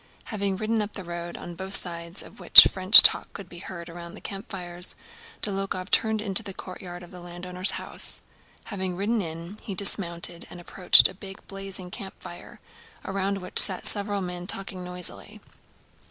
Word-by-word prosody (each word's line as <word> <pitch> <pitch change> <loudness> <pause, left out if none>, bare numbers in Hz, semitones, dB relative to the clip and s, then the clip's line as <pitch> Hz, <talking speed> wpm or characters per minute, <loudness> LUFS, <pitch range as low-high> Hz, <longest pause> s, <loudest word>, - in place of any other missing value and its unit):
Having 200 -2 -2
ridden 220 +2 -1
up 210 0 -5
the 195 - -6
road, 170 0 -7
on 175 - -9
both 190 +3 +3
sides 170 +1 0
of - - -16
which 180 - +10
French 190 +3 +8
talk - - +2
could 195 - -10
be 175 -1 -12
heard 170 -1 -9
around 170 0 -10
the - - -11
campfires, 180 -3 -7 0.5
Dólokhov 195 -2 -4
turned 220 -1 +1
into 195 -4 +1
the 195 - -9
courtyard 180 -1 -10
of 175 - -14
the 180 - -11
landowner's 180 +2 -5
house. - - -3 0.4
Having 190 -4 -5
ridden 210 +4 -1
in, 170 +3 -8
he 200 -4 -7
dismounted 170 -3 -2
and 175 - -11
approached 180 +1 +5
a - - -11
big 195 0 -12
blazing 195 -2 -4
campfire, 190 -3 -11 0.5
around 195 +1 -3
which 180 - +3
sat 185 -2 +4
several 205 -1 0
men 180 0 -7
talking 190 -2 -3
noisily. 180 0 -3
185 Hz, 170 wpm, -25 LUFS, 175-195 Hz, 0.5 s, which